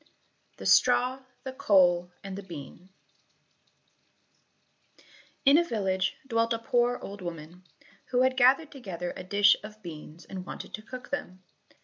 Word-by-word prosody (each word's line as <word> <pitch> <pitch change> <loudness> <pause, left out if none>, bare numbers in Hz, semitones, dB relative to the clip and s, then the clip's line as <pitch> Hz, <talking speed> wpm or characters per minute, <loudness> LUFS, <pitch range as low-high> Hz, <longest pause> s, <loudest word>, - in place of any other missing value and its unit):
18 - - -31 0.5
The - - -9
Straw, 255 +2 +4 0.2
the 265 - -6
Coal, 180 -6 +3
and 195 -1 -6
the 200 - -6
Bean 175 0 -10 2.6
In 280 +4 +7
a - - +3
village 195 - -1
dwelt 230 -2 +1
a - - 0
poor 240 +1 +1
old 200 0 -8
woman, 170 +1 -8 0.4
who 250 0 +2
had 260 0 +2
gathered 270 +5 +4
together 180 - -6
a - - -7
dish 200 +2 +5
of 215 0 -11
beans 160 0 -10
and 190 -1 -7
wanted - - -8
to 215 - -6
cook 255 +3 -10
them. 185 -10 -5
200 Hz, 145 wpm, -28 LUFS, 180-245 Hz, 2.6 s, In